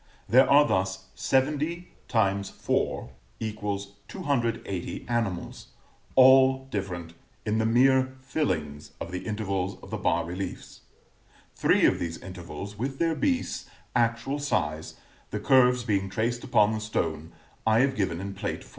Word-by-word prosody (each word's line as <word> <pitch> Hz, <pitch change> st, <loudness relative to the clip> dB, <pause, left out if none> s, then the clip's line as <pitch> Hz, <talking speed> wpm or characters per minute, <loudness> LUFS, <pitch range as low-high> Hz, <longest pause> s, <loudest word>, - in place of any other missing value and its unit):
There 130 Hz, +3 st, +5 dB
are 145 Hz, +1 st, +6 dB
thus 95 Hz, 0 st, -1 dB
70 150 Hz, +6 st, 0 dB, 0.2 s
x 100 Hz, -4 st, +1 dB
4=280 105 Hz, 0 st, -3 dB
animals, 115 Hz, -7 st, -2 dB, 0.5 s
all 130 Hz, 0 st, +6 dB
different, 90 Hz, -5 st, -4 dB, 0.3 s
in 110 Hz, +1 st, +1 dB
the 110 Hz, -, +2 dB
mere 130 Hz, +2 st, +4 dB
fillings 80 Hz, -, -3 dB
of 85 Hz, -, -6 dB
the 90 Hz, +3 st, -5 dB
intervals 100 Hz, -3 st, -2 dB
of -, -, -11 dB
the -, -, -3 dB
bas -, -, +1 dB
reliefs. 90 Hz, +2 st, -6 dB, 0.7 s
Three -, -, +3 dB
of -, -, +3 dB
these 85 Hz, -1 st, -3 dB
intervals, 95 Hz, +3 st, -8 dB
with 135 Hz, +3 st, -3 dB
their 165 Hz, +1 st, +1 dB
beasts, 265 Hz, -, -1 dB, 0.3 s
actual 120 Hz, +4 st, +1 dB
size, 85 Hz, -, -2 dB, 0.3 s
the -, -, -3 dB
curves 125 Hz, -2 st, +4 dB
being 100 Hz, -4 st, 0 dB
traced 120 Hz, +4 st, -1 dB
upon 105 Hz, 0 st, +3 dB
the 110 Hz, -, -2 dB
stone, 80 Hz, -6 st, -2 dB, 0.4 s
I 110 Hz, +2 st, +5 dB
have 135 Hz, 0 st, +2 dB
given 95 Hz, -6 st, -1 dB
in 100 Hz, +1 st, -5 dB
Plate 95 Hz, -, -4 dB
XIV. -, -, -15 dB
110 Hz, 135 wpm, -27 LUFS, 95-130 Hz, 0.7 s, are